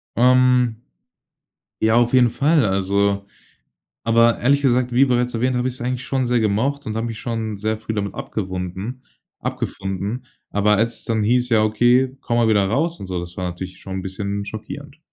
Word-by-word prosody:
Ähm 125 -1 +4 1.1
ja, 110 +1 +4
auf 120 +1 +3
jeden 125 -2 +5
Fall, 145 +5 +2
also 100 0 +1 0.8
aber 115 0 +4
ehrlich 140 +3 +3
gesagt, 125 -2 +2
wie 130 +3 +5
bereits 125 -1 +1
erwähnt, 125 +2 0
habe 125 +1 0
ich's 130 0 -7
eigentlich 125 +1 -2
schon 130 -1 -1
sehr 120 0 +2
gemocht 115 +7 0
und 110 - -4
habe 115 +1 -1
mich 115 -2 -5
schon 110 -2 -3
sehr 110 +2 -2
früh 110 0 -5
damit 100 -1 -2
abgewunden 95 +5 -5 0.4
abgefunden. 100 +6 -4 0.2
Aber 105 +1 +3
als 115 +3 0
es - - -10
dann 110 -2 0
hieß. 125 +3 +2
„Ja, 110 -3 +3
okay, 120 +4 +3
komm 120 - -1
mal 120 -1 +3
wieder 105 -3 +3
raus“ 160 - 0
und - - -6
so, 90 -1 -3
das 85 0 -9
war 90 - -2
natürlich 90 +1 -7
schon 95 -1 -5
'n - - -9
bisschen 100 +1 -4
schockierend. 140 +8 -8
115 Hz, 185 wpm, -21 LUFS, 100-125 Hz, 1.1 s, jeden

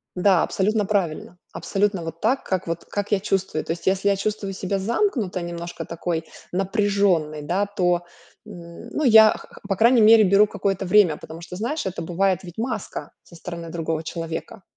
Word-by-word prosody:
Да, 180 -1 +4
абсолютно 210 +2 0
правильно. 180 -3 -2 0.2
Абсолютно 200 -3 -1
вот 165 0 -7
так, 255 +5 +1
как 185 -1 -2
вот 165 0 -4
как 205 0 -4
я 205 - +3
чувствую. 190 -5 -1
То - - -3
есть, 170 +2 -5
если 195 +1 +2
я 200 - +3
чувствую 200 -1 -3
себя 195 +1 -2
замкнуто 220 - -1
немножко, 170 0 -6
такой 165 -1 -3 0.3
напряженной, 195 -5 +1
да, 180 +7 0
то, 180 -3 0 0.4
м, 170 +6 -11
ну, 300 - -2
я, 220 -3 +8
х - - -7
х - - -15
по 195 - 0
крайней 235 +4 +5
мере, 220 0 +7
беру 200 +2 +5
какое-то 200 -2 -2
время, 180 -4 +4
потому 160 +1 -10
что, 175 +1 -8
знаешь, 240 - -3
это 185 - -4
бывает 185 +2 0
ведь 175 -1 -11
маска 225 -3 -4
со 170 - -17
стороны 170 0 -7
другого 165 -1 -3
человека. 165 +3 -6
190 Hz, 185 wpm, -23 LUFS, 170-205 Hz, 0.4 s, я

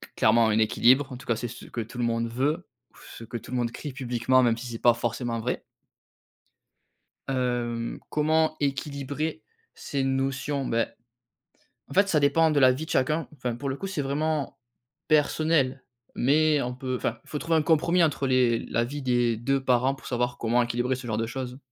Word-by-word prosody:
clairement 115 +1 +4
un 105 - +2
équilibre, 125 +5 +4
en 125 - -6
tout 130 - -13
cas, 115 - +2
c'est 120 +2 -4
ce 120 - -10
que 120 - -5
tout 115 +2 -9
le 120 - -1
monde 115 0 0
veut, 145 +9 -1 0.3
ou - - -21 0.2
ce - - -9
que 115 - -10
tout 115 - -12
le 125 - -1
monde 120 -1 0
crie 145 +3 -7
publiquement 130 0 +2
même 115 -2 +2
si 125 +2 -7
c'est 115 -1 -6
pas 120 - +5
forcément 120 0 -2
vrai. 125 +3 -3 1.6
Hem, 120 -3 -2
comment 155 +1 +2
équilibrer 140 +2 -3 0.3
ces 140 -2 -3
notions? 135 +1 -1
Beh, 115 -1 +1 1.0
en 140 - -9
fait, 200 +3 +4
ça 155 -5 +3
dépend 160 +3 +4
de 150 -2 +2
la 130 -1 +7
vie 150 +5 -5
de - - -11
chacun, 155 +5 +1
enfin 125 -4 -3
pour 140 +3 -4
le 135 - -2
coup, 195 - -5
c'est 190 -6 -2
vraiment 145 +1 -1 0.5
personnel 150 -3 +2 0.4
mais 150 +3 +3
on 125 0 -3
peut 130 -1 -3
enfin, 120 -2 -2
faut 150 - -5
trouver 165 -1 +1
un - - +2
compromis, 170 +3 +3
entre 140 -3 0
les 125 -3 +3
la 115 - 0
vie 140 +4 -5
des 120 -2 +2
2 135 +4 0
parents 130 +1 +2
pour 135 - -14
savoir 120 0 -1
comment 120 +1 +2
équilibrer 120 +2 0
ce 125 -1 -7
genre 110 - -1
de 115 - -1
choses. 125 +1 -5
130 Hz, 200 wpm, -26 LUFS, 120-145 Hz, 1.6 s, la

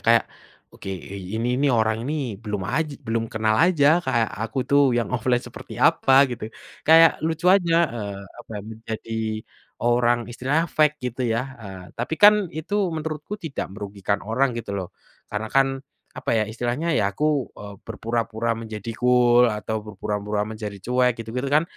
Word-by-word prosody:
kayak 115 -1 +5 0.5
oke - - -10 0.5
ini 115 +2 -1
nih 145 - +3
orang 110 0 +1
ini 145 - -2 0.3
belum 105 -3 -3
aj 150 - 0 0.2
belum 115 0 0
kenal 110 0 +1
aja 165 -6 +3 0.2
kayak 120 -4 +1
aku 115 +3 -3
tuh 140 0 +5 0.2
yang 120 - 0
offline 125 0 +1
seperti - - -10
apa 135 - +3 0.2
gitu, 110 -2 -6 0.4
kayak 165 +1 +7
lucu 165 +1 -3
aja, 170 -4 +2 0.2
eee, 100 -3 -5
apa 120 - -13
ya - - -4
menjadi 110 0 -6 0.7
orang 120 0 +3
istilahnya 135 +7 0
fake 150 -1 +4 0.2
gitu 130 - -10
ya, 115 - +1 0.2
eee, 95 -3 -9
tapi 120 +7 -2
kan 210 +1 +10
itu 160 +7 -5 0.2
menurutku 155 +5 -4
tidak 155 -4 -3
merugikan 100 0 -3
orang 130 +6 +1
gitu 115 - -5
loh, 95 -3 -4 0.4
karena 110 +1 -4
kan, 135 0 +4 0.5
apa - - -3
ya 110 - +3
istilahnya 120 +8 -2
ya 100 -1 +1
aku, 150 - -1 0.3
eee, 100 -1 -9
berpura-pura 115 0 -2
menjadi 110 -1 -6
cool 125 -1 +5
atau 110 -1 -2
berpura-pura 105 0 -3
menjadi 105 -2 -6
cuek 125 +3 +2
gitu-gitu 120 +4 -4
kan 150 +2 +5
115 Hz, 160 wpm, -23 LUFS, 110-135 Hz, 0.7 s, kan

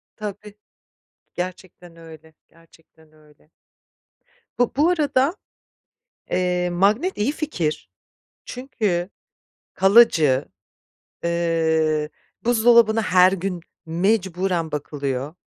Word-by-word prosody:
Tabii. 210 0 -8 0.8
Gerçekten 180 -1 -7
öyle, 160 -1 -15 0.2
gerçekten 165 -1 -24
öyle. 150 -1 -25 1.1
Bu 245 - +2
bu 305 +4 +4
arada, 300 -2 +1 1.0
eee, 180 -1 0
magnet 210 - +1
iyi 215 +7 0
fikir, 165 - -3 0.5
çünkü 210 -8 -3 0.6
kalıcı, 185 - +4 0.8
eee, 160 -2 0 0.4
buzdolabına 230 -1 +4
her 185 -2 +4
gün 190 -1 -3 0.3
mecburen 180 -1 -1
bakılıyor. 140 -1 -4
180 Hz, 80 wpm, -22 LUFS, 160-215 Hz, 1.1 s, bu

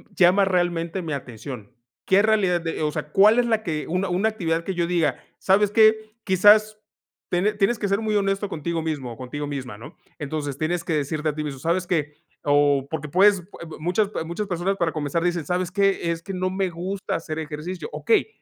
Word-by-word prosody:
llama 185 +2 +5
realmente 175 -1 0
mi 155 - -3
atención?". 125 -4 -7 0.3
¿Qué 190 +1 +4
realidad 195 -5 +2
de-?, 165 -1 -4
o 150 - +1
sea, 150 -1 -5
¿cuál 215 +7 +6
es 245 - +3
la 220 -2 +1
que 155 -5 -3
una 185 +2 -1
una 195 +5 +1
actividad?, 165 -6 -2
que 190 +2 -4
yo 170 -1 0
diga: 175 -3 0 0.2
"¿Sabes 200 +2 +3
qué?", 220 0 +6 0.3
quizás 210 +3 +5 0.5
tiene 195 +4 +1
tienes 210 +3 +1
que 205 - -1
ser 200 +1 +1
muy 215 -1 -1
honesto 195 0 0
contigo 165 -1 -3
mismo 145 -6 -3
o - - -14
contigo 145 +3 -5
misma, 130 -6 -6
¿no?, 115 - -12 0.2
entonces, 145 -2 -4
tienes 170 +2 -1
que 165 - -1
decirte 150 +1 -1
a 145 - -4
ti 150 - -3
mismo: 140 -3 -5
"¿Sabes 170 +4 0
qué?", 150 -4 -1 0.3
o 145 -1 +3
porque 150 -2 -4
puedes, 195 +3 +4
eh, 170 -2 -12
muchas, 185 +6 0
eh, - - -4
muchas 170 +6 -4
personas 185 +1 -1
para 170 -3 0
comenzar 155 +2 -2
dicen: 175 -3 -1
"¿Sabes 180 +1 -1
qué?, 195 -3 +1
es 165 0 -5
que 195 - -6
no 185 0 -1
me 190 -1 -1
gusta 185 +3 -4
hacer 160 -1 -4
ejercicio". 160 - -6
Okey, 440 -4 +2
175 Hz, 210 wpm, -23 LUFS, 155-195 Hz, 0.5 s, cuál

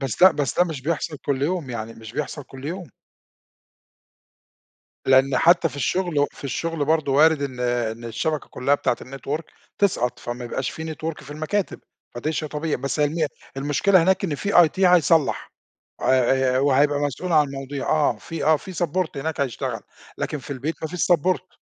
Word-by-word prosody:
بس 135 +4 -3
ده 185 - +10
بس 145 -5 -2
ده 180 - +6
مش 155 -6 -5
بيحصَل 155 0 -2
كُلّ 140 -1 0
يوم، 160 -4 -1
يعني 115 -1 -5
مش 110 0 -11
بيحصَل 150 +1 -4
كُلّ 135 +1 -12
يوم. 175 -1 -5 2.2
لإن 130 0 +4
حتى 170 0 +5
في 145 - -11
الشُّغل 175 +3 0
و 145 - +4
في - - -14
الشُّغل 155 +3 -2
برضه 155 -2 +1
وارد 155 +1 +5
إن 130 -3 -4
إن 120 -2 -1
الشَّبَكَة 150 +6 -2
كُلّها 135 +3 +1
بتاعة 125 - 0
الNetwork 135 +4 -4 0.4
تسقَط، 125 - +1
فما 120 +1 -6
يبقاش 125 +2 -3
في 160 0 -6
Network 160 0 -5
في 145 - -12
المكاتب، 155 +7 -2 0.3
فدي 150 +7 -2
شيء 155 0 -3
طبيعي. 150 +1 -2
بس 140 +4 -3
هي 150 - +5
الم 155 +1 0 0.3
المشكلة 150 +7 +3
هناك 190 +3 +2
إن 160 -6 -1
في 200 +7 -3
IT 175 +3 +5
هيصلّح، 165 -4 +3 0.5
آآ 130 0 +3
آآ - - +3
وهيبقى 145 +1 +3
مسؤول 145 +5 -2
عن 150 -2 +5
المواضيع 135 0 -5
آه، 150 -6 +2
في 165 +8 -5
آه، 155 0 +5
في 190 +4 -10
Support 175 0 -1
هناك 150 +2 -3
هيشتغل، 130 -5 -2 0.4
لكن 150 - -2
في 135 - -11
البيت 140 +5 -3
ما 160 - -2
فيش 180 +2 +1
Support. 185 +3 0
145 Hz, 180 wpm, -23 LUFS, 135-165 Hz, 2.2 s, ده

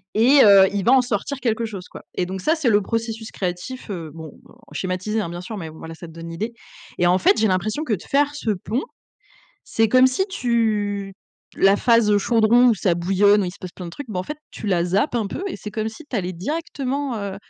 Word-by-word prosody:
et 260 +6 +6
heu, 195 -2 +8
il 200 - -1
va 240 - +5
en 265 - +6
sortir 250 +3 -3
quelque 230 -2 -1
chose, 200 -5 -7
quoi - - -12
et 180 - 0
donc 190 +1 -5
ça, 315 - +2
c'est 310 -7 +1
le 205 -1 +4
processus 225 +1 -4
créatif, 190 +7 -5
heu, 165 -5 -5
bon, 160 0 -8 0.2
heu, - - -19 0.2
schématisé, 185 +4 -2
hein, 170 - -4
bien 175 +1 -6
sûr 210 +4 -7
mais 165 -4 -6
voilà, 160 +1 -10
ça 170 - -10
te - - -12
donne 165 0 -8
l'idée 215 +8 -4 0.5
et 175 - +4
en 180 +1 +4
fait, 190 - +3
j'ai 220 - +3
l'impression 215 - -1
que 245 - -1
de 195 - -2
faire 290 +1 +1
ce 230 -6 -1
pont, 210 +6 -2 0.8
c'est 225 0 +1
comme 255 +3 +6
si 320 +9 0
tu 210 - -1 0.4
la 195 +1 +5
phase, 230 -2 +3
heu, 205 - +4
chaudron 230 +3 +4
où 230 - +4
ça 180 -2 +1
bouillonne 195 +4 +3
où - - -1
il - - -3
se 195 - -15
passe 185 -2 -8
plein 180 - -8
de - - -7
trucs, 265 +9 -9
bah, 185 - -3
en - - -3
fait, 300 - -6
tu - - -8
la 180 -4 +2
zappes 200 - 0
un 225 -3 0
peu 270 - -5
et - - -5
c'est 210 - -8
comme 220 +1 -2
si 225 +8 -11
tu - - -7
allais 185 -3 -2
directement, 280 - -3
heu, 200 -2 -5
210 Hz, 250 wpm, -22 LUFS, 185-240 Hz, 0.8 s, heu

